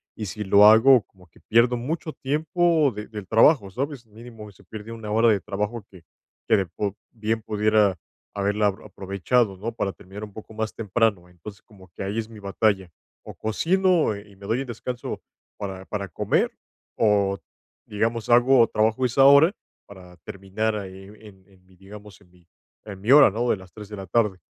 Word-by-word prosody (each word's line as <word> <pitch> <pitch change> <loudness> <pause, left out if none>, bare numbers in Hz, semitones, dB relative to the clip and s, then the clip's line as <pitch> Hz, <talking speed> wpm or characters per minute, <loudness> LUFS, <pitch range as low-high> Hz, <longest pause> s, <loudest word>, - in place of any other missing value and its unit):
y 110 - -5
si 105 +2 -5
lo 100 +2 +6
hago, 115 +3 +7
como 95 -2 -23
que - - -24
pierdo 120 +2 +2
mucho 155 +6 -4
tiempo 160 +2 +1
de 105 0 -7
del 105 -4 -9
trabajo, 110 - +4
¿sabes?, 130 +2 -5
mínimo 110 -1 -12
se 100 0 -21
pierde 110 +4 -10
una 110 -2 -7
hora 115 +1 +4
de 105 - +2
trabajo 105 +2 -4
que 95 - -15 0.5
que - - +5
de 95 - 0
po 100 +3 -4 0.2
bien 110 -1 -3
pudiera 105 -3 +1 0.3
haberla 105 +1 0
a - - +4
aprovechado, 100 +2 -2
¿no?, 110 +4 -5
para 100 -4 -3
terminar 100 +3 -11
un 105 - -9
poco 110 +1 -12
más 110 0 -3
temprano. 105 -4 -1
Entonces, 95 +4 -12
como 95 -5 -19
que - - -11
ahí 100 +3 -3
es 110 -1 -2
mi 110 -2 -12
batalla, 100 -1 0 0.3
o - - -11
cocino, 170 - +1
eh, 100 +1 -11
y 100 - -18
me 100 +1 -12
doy 120 +5 0
el - - -5
descanso 120 +1 -6 0.4
para 95 -2 -6
para 100 -1 -5
comer, 85 - 0 0.5
o, 100 -3 +2 0.5
digamos, 115 +2 -2
hago 120 0 +5
trabajo 110 +4 0
esa 135 +3 +3
hora 140 +6 +7 0.3
para 90 -3 -14
terminar, 100 +5 -4
eh, 95 +3 -13
en 95 -2 -18
en 95 -2 -25
mi, 95 - -23
digamos, 105 +2 -14
en 95 - -23
mi 90 -1 -26 0.4
en 100 -3 -9
mi 115 - 0
hora, 140 -7 +8
¿no?, 120 +3 -2
de - - +1
las 95 -2 -16
3 105 -2 -11
de 105 - -7
la 95 - -7
tarde. 105 -1 0
105 Hz, 195 wpm, -24 LUFS, 100-115 Hz, 0.5 s, hora